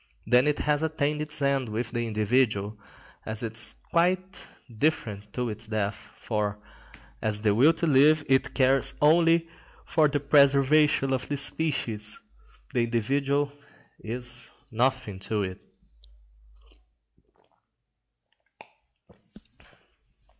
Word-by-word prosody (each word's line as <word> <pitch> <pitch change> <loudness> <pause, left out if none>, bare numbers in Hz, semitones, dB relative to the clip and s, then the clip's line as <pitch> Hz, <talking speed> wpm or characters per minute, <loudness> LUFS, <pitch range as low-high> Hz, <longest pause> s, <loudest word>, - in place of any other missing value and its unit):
Then 125 +4 +4
it 150 - +1
has 150 0 0
attained 150 -1 -1
its 150 0 -2
end 135 -3 0
with 115 +2 -4
the 120 -1 -2
individual, 110 -1 0 0.5
and 110 0 -5
is 110 0 0 0.2
quite 185 +2 0 0.2
indifferent 110 -5 -2
to 125 -1 -2
its 110 +1 -6
death, 105 -1 -3
for, 105 -2 -2 0.6
as 105 -1 -1
the 105 -2 +2
will 130 +9 +5
to 165 - -2
live, 150 +1 +4
it 135 -1 +1
cares 135 0 +2
only 165 +2 +4 0.4
for 155 -2 +3
the 145 0 -1
preservation 140 0 +3
of 130 -1 -3
the 145 - -1
species, 125 -8 -3 0.5
the 120 - +2
individual 140 +5 0 0.5
is 120 +2 -4 0.2
nothing 120 -4 -1
to 105 +1 -2
it. 95 -1 -6
130 Hz, 110 wpm, -26 LUFS, 110-150 Hz, 0.6 s, will